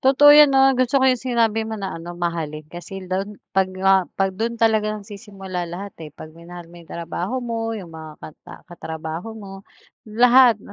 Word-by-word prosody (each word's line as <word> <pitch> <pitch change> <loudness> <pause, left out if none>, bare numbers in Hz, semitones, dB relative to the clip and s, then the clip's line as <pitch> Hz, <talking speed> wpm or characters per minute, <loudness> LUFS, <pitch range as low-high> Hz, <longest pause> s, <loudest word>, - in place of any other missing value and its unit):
Totoo 285 +2 +6
'yan, 300 -1 +8
'no? 270 0 +4
Gusto 255 +2 +1
ko 265 - +3
'yong 255 -2 +3
sinabi 225 -3 0
mo 220 - -4
na 195 -2 -5
ano, 175 +1 -8
mahalin. 160 -3 -4
Kasi 185 +2 -8
lon 195 +3 -4 0.2
pag 190 -1 +2
nga 190 0 +2
pag 195 -1 0
dun 230 +4 -3
talaga 215 -2 +1
nagsisimula 195 -4 -7
lahat, 195 +3 -7
eh, 155 - -7
pag 155 +2 -12
minahal 175 +1 -11
mo 175 - -13
'yong 165 - -18
trabaho 170 +6 -5
mo, 225 -1 -3
'yong 175 -5 -9
mga 160 -1 -9
kata 155 - -12
katrabaho 165 +4 -7
mo, 200 -3 -10 0.6
lahat 245 +1 +5
'no, 200 - -15
195 Hz, 190 wpm, -21 LUFS, 175-230 Hz, 0.6 s, yan